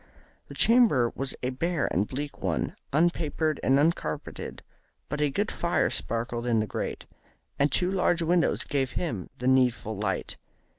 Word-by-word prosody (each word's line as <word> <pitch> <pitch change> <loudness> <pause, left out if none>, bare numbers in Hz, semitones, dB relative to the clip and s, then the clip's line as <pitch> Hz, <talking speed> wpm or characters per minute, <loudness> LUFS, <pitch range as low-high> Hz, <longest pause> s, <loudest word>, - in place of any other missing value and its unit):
The - - -10
chamber 220 - +4
was 135 0 -1
a 125 - 0
bare 165 +4 -1
and 100 +4 +1
bleak 145 +2 -5
one, - - -1 0.2
un 165 +5 +4
papered 155 -2 -1
and 135 +1 +3
un 155 +4 +5
carpeted, 75 - -6 0.5
but 150 - -2
a 150 - +3
good 205 +10 -1
fire 170 0 +1
sparkled 120 +1 -2
in 115 -2 +3
the 110 - +1
grate, - - -4 0.5
and 140 0 +3
two 180 +6 +1
large 175 -3 +2
windows 170 +1 +2
gave 135 -2 -1
him 115 - -3
the 125 - -6
needful 125 -4 +2
light. 100 -1 -3
140 Hz, 165 wpm, -27 LUFS, 120-170 Hz, 0.5 s, un